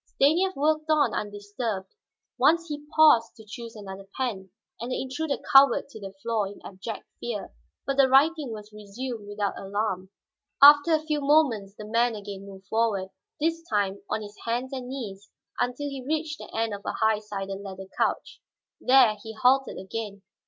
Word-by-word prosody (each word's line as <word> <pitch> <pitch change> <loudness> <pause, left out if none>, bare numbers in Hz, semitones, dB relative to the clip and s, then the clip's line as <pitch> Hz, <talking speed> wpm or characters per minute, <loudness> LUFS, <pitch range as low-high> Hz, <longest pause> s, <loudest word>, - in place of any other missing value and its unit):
Stanief 345 +7 +3
worked 310 +2 +1
on 305 -1 +3
undisturbed; 205 0 -4 0.5
once 335 +1 +3
he 295 0 -6
paused 300 -8 +6
to 220 - -14
choose 230 +2 -9
another 195 -2 -9
pen, 205 -8 -3 0.3
and 240 +3 -5
the - - -1
intruder 280 +3 -2 0.2
cowered 270 -1 +6
to 220 - -10
the 195 -2 -7
floor 225 -3 0
in 200 - -10
abject 200 +3 -7 0.2
fear. 225 -4 -5 0.3
But 275 0 -1
the 270 -1 +5
writing 290 0 +4
was 210 -1 -9
resumed 210 +2 -7
without 205 -1 -3
alarm. 195 -1 -2 0.5
After 290 +3 +8
a 310 - -2
few 300 -2 -1
moments 270 -9 +2
the 210 - -9
man 230 +2 +1
again 200 -1 -8
moved 195 -1 -12
forward, 210 -3 0 0.3
this 330 +2 0
time 200 -2 0
on 215 - -2
his 205 0 -11
hands 245 +4 -2
and 255 -2 -5
knees, 205 -7 -7 0.3
until 250 +4 -1
he 275 -2 -6
reached 305 +2 -2
the - - -9
end 225 -1 -1
of 200 - -6
a - - -3
high 220 -1 +2
sided 195 -2 -5
leather 190 -1 -8
couch. - - -1 0.4
There 250 -5 +5
he 220 +1 -8
halted 260 +4 +3
again. 200 0 -6
230 Hz, 175 wpm, -26 LUFS, 205-275 Hz, 0.5 s, After